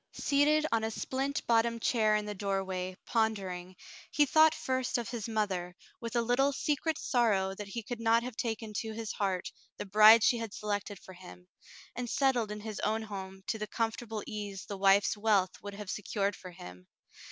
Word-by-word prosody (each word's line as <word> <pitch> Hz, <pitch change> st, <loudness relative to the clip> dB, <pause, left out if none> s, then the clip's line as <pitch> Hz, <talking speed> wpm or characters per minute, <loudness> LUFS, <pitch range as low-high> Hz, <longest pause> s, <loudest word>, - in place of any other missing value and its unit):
Seated 295 Hz, +2 st, +3 dB
on 225 Hz, -1 st, +1 dB
a 220 Hz, -, 0 dB
splint 270 Hz, +5 st, -3 dB
bottomed 230 Hz, 0 st, +2 dB
chair 215 Hz, -3 st, +3 dB
in 210 Hz, 0 st, 0 dB
the 210 Hz, -, -4 dB
doorway, 190 Hz, -2 st, -3 dB
pondering, 190 Hz, -5 st, -1 dB, 0.3 s
he 295 Hz, -, +3 dB
thought 315 Hz, +3 st, +5 dB
first 260 Hz, 0 st, -1 dB
of 235 Hz, -2 st, -4 dB
his 235 Hz, -2 st, -4 dB
mother, 190 Hz, -5 st, -2 dB, 0.2 s
with 230 Hz, 0 st, -6 dB
a 235 Hz, -, +2 dB
little 255 Hz, +4 st, +2 dB
secret 300 Hz, +2 st, -1 dB
sorrow 205 Hz, -6 st, +1 dB
that 205 Hz, +1 st, -7 dB
he 230 Hz, +3 st, -5 dB
could 240 Hz, +2 st, -6 dB
not 230 Hz, +1 st, +3 dB
have 250 Hz, -1 st, -6 dB
taken 220 Hz, -2 st, -3 dB
to 220 Hz, -1 st, -5 dB
his 225 Hz, -1 st, -4 dB
heart 190 Hz, -3 st, -2 dB, 0.3 s
the -, -, -5 dB
bride 215 Hz, +3 st, +8 dB
she 240 Hz, -, +3 dB
had 225 Hz, -3 st, -5 dB
selected 205 Hz, -1 st, -3 dB
for 185 Hz, -, -13 dB
him, 180 Hz, 0 st, -13 dB, 0.5 s
and 245 Hz, 0 st, -4 dB
settled 250 Hz, -5 st, +1 dB
in 210 Hz, 0 st, -6 dB
his 215 Hz, -1 st, -6 dB
own 220 Hz, +1 st, 0 dB
home 190 Hz, -2 st, -8 dB
to 220 Hz, -, -2 dB
the 215 Hz, -, -3 dB
comfortable 225 Hz, 0 st, -3 dB
ease 205 Hz, -2 st, -6 dB
the 200 Hz, -, -5 dB
wife's 195 Hz, +1 st, +4 dB
wealth 205 Hz, -3 st, +1 dB
would 205 Hz, -1 st, -7 dB
have 205 Hz, -2 st, -6 dB
se -, -, -4 dB
cured 200 Hz, 0 st, -1 dB
for 185 Hz, -, -10 dB
him. 90 Hz, -, -12 dB
215 Hz, 195 wpm, -31 LUFS, 195-235 Hz, 0.5 s, bride